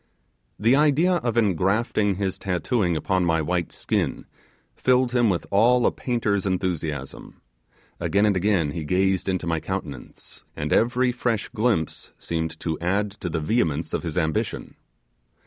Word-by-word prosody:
The 115 Hz, +6 st, +3 dB
idea 155 Hz, +5 st, +3 dB
of 120 Hz, -7 st, -2 dB
engrafting 100 Hz, +1 st, +1 dB
his 95 Hz, -1 st, -3 dB
tattooing 90 Hz, -1 st, 0 dB
upon 95 Hz, +4 st, 0 dB
my 80 Hz, -2 st, +2 dB
white 85 Hz, +2 st, -1 dB
skin -, -, -2 dB, 0.5 s
filled 130 Hz, -1 st, +2 dB
him 120 Hz, -3 st, +3 dB
with 90 Hz, -3 st, -1 dB
all 120 Hz, +5 st, +4 dB
a -, -, +4 dB
painter's 110 Hz, -6 st, -1 dB
enthusiasm; 85 Hz, -7 st, -3 dB, 0.6 s
again 100 Hz, +2 st, +2 dB
and 105 Hz, -2 st, +2 dB
again 90 Hz, -5 st, +1 dB
he 80 Hz, +1 st, -4 dB
gazed 95 Hz, +4 st, +1 dB
into 90 Hz, -3 st, -1 dB
my 80 Hz, -1 st, 0 dB
countenance, 80 Hz, -6 st, -7 dB
and 75 Hz, 0 st, -2 dB
every 125 Hz, +2 st, +2 dB
fresh 120 Hz, -3 st, -2 dB
glimpse 110 Hz, -8 st, -1 dB
seemed 80 Hz, -1 st, -4 dB
to 80 Hz, -2 st, -2 dB
add 100 Hz, +4 st, 0 dB
to 95 Hz, -3 st, -6 dB
the 80 Hz, 0 st, -2 dB
vehemence 80 Hz, -3 st, 0 dB
of -, -, 0 dB
his 85 Hz, -2 st, -5 dB
ambition. 80 Hz, -3 st, -2 dB
95 Hz, 145 wpm, -24 LUFS, 80-115 Hz, 0.6 s, all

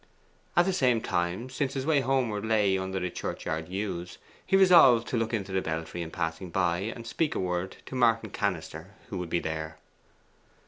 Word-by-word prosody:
At 175 Hz, -, +6 dB
the 190 Hz, -, +1 dB
same 125 Hz, -9 st, +3 dB
time, 85 Hz, +4 st, -1 dB
since 135 Hz, +1 st, -2 dB
his 135 Hz, -1 st, -2 dB
way 155 Hz, -2 st, +3 dB
homeward 125 Hz, -6 st, 0 dB
lay 105 Hz, -3 st, +2 dB
under 95 Hz, 0 st, -2 dB
the 90 Hz, -1 st, -3 dB
churchyard 80 Hz, -1 st, -4 dB
yews, 90 Hz, -2 st, -4 dB, 0.3 s
he 195 Hz, -, +3 dB
resolved 165 Hz, -12 st, +7 dB
to -, -, -1 dB
look 115 Hz, -1 st, 0 dB
into 100 Hz, -4 st, -3 dB
the 95 Hz, 0 st, +1 dB
belfry 80 Hz, +1 st, -4 dB
in 85 Hz, -, -5 dB
passing 85 Hz, +1 st, -3 dB
by, 85 Hz, 0 st, +1 dB
and 115 Hz, +4 st, -5 dB
speak 150 Hz, +6 st, -1 dB
a -, -, -1 dB
word 90 Hz, 0 st, -2 dB
to -, -, -10 dB
Martin 115 Hz, -4 st, +2 dB
Cannister, 90 Hz, -1 st, -3 dB
who 95 Hz, -5 st, -4 dB
would 90 Hz, -2 st, -5 dB
be 85 Hz, -, +1 dB
there. 80 Hz, -1 st, -4 dB
100 Hz, 190 wpm, -28 LUFS, 85-120 Hz, 0.3 s, resolved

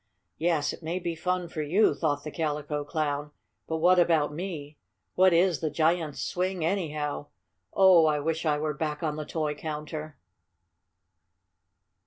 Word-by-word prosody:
"Yes, 155 Hz, -3 st, +1 dB
it -, -, -11 dB
may 165 Hz, +2 st, -3 dB
be 175 Hz, -2 st, -3 dB
fun 180 Hz, +2 st, -2 dB
for 165 Hz, -2 st, -5 dB
you," 175 Hz, +9 st, +3 dB
thought 145 Hz, -3 st, -1 dB
the 150 Hz, -, -6 dB
Calico 150 Hz, -2 st, -2 dB
Clown, 145 Hz, -1 st, -2 dB, 0.4 s
"but 160 Hz, -, -1 dB
what 180 Hz, +3 st, +5 dB
about 160 Hz, -4 st, +3 dB
me? 155 Hz, -4 st, -6 dB, 0.3 s
What 185 Hz, 0 st, +5 dB
is 175 Hz, 0 st, +3 dB
the 160 Hz, -, -1 dB
giant's 160 Hz, 0 st, 0 dB
swing, 180 Hz, -2 st, -1 dB
anyhow? 155 Hz, -6 st, -2 dB, 0.4 s
Oh, 185 Hz, -4 st, +6 dB
I 150 Hz, -1 st, +2 dB
wish 160 Hz, +2 st, -1 dB
I 150 Hz, -3 st, +2 dB
were 155 Hz, 0 st, -1 dB
back 150 Hz, +2 st, -3 dB
on 155 Hz, -2 st, -1 dB
the 155 Hz, 0 st, -5 dB
toy 155 Hz, -1 st, -2 dB
counter!" 150 Hz, 0 st, -6 dB
155 Hz, 155 wpm, -28 LUFS, 150-175 Hz, 0.4 s, Oh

